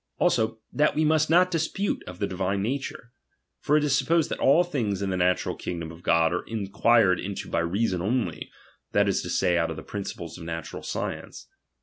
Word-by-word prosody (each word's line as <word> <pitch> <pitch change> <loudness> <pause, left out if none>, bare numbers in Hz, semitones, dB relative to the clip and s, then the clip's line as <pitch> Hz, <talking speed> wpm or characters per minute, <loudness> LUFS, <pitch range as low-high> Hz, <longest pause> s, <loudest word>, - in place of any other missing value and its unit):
Also, 110 0 +1 0.2
that 150 +1 +2
we 155 +1 +2
must 155 0 +3
■^ot 180 +2 +5
dispute 170 +4 -1
of 90 - -8
the 100 - -1
divine 95 +1 -1
nature; 125 0 -4 0.5
for 150 - +2
it 150 - +1
is 145 -2 +2
sup 135 - 0
posed 165 -2 +2
that - - -3
all 150 +6 +5
things 120 - -2
in 95 - -1
the - - 0
natural 90 0 +1
kingdom 85 -2 -5
of 85 +1 -13
God 85 -1 +3
are 90 - -1
inquired 110 -2 +2
into 100 +1 -5
by - - +1
reason 90 +2 0
only, 105 -4 -1 0.4
that - - +3
is - - +1
to - - -6
Say, 85 -1 +2
out 85 - 0
of 80 - -4
the 80 - -7
principles 90 -5 -6
of - - -9
natural 80 -1 -5
science. - - -5
100 Hz, 210 wpm, -26 LUFS, 90-145 Hz, 0.5 s, ■^ot